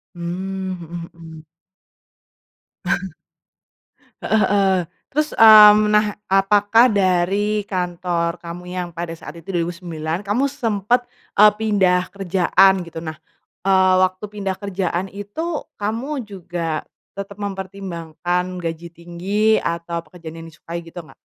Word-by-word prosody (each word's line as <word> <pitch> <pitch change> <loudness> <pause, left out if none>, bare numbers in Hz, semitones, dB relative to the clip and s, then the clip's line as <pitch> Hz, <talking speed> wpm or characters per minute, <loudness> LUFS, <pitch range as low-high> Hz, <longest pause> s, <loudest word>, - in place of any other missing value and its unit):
Mmm, 185 +2 -4
mhm 170 -1 -8
mhm. 160 -2 -12 2.8
Heeh, 220 - +2
heeh, 195 -1 +3 0.4
terus, 305 +2 +1
mmm, 210 -1 +8
nah 210 -1 +2
apakah 205 +5 +4
dari 200 +1 +1
kantor 175 -2 -2
kamu 170 +1 -8
yang 180 0 -4
pada 170 0 -5
saat 165 0 -10
itu 170 +4 -8
2009 170 0 -3
kamu 245 +8 +1
sempet, 240 -2 0 0.3
eee, 210 +1 +8
pindah 195 -4 +1
kerjaan 190 0 +3
gitu 170 -1 -10
nah, 160 -1 -5 0.5
eee, 190 -1 +4
waktu 185 +2 0
pindah 200 -2 -4
kerjaan 190 -2 -2
itu 290 +12 -4 0.2
kamu 235 +6 -3
juga 175 -5 -4 0.3
tetap 200 +1 -7
mempertimbangkan 185 -3 -4
gaji 170 0 -5
tinggi 180 +6 0
atau 170 0 -3
pekerjaan 165 0 -11
yang 165 - -10
disukai 170 +2 -7
gitu 165 +1 -15
ngga? - - -16
185 Hz, 115 wpm, -20 LUFS, 170-205 Hz, 2.8 s, mmm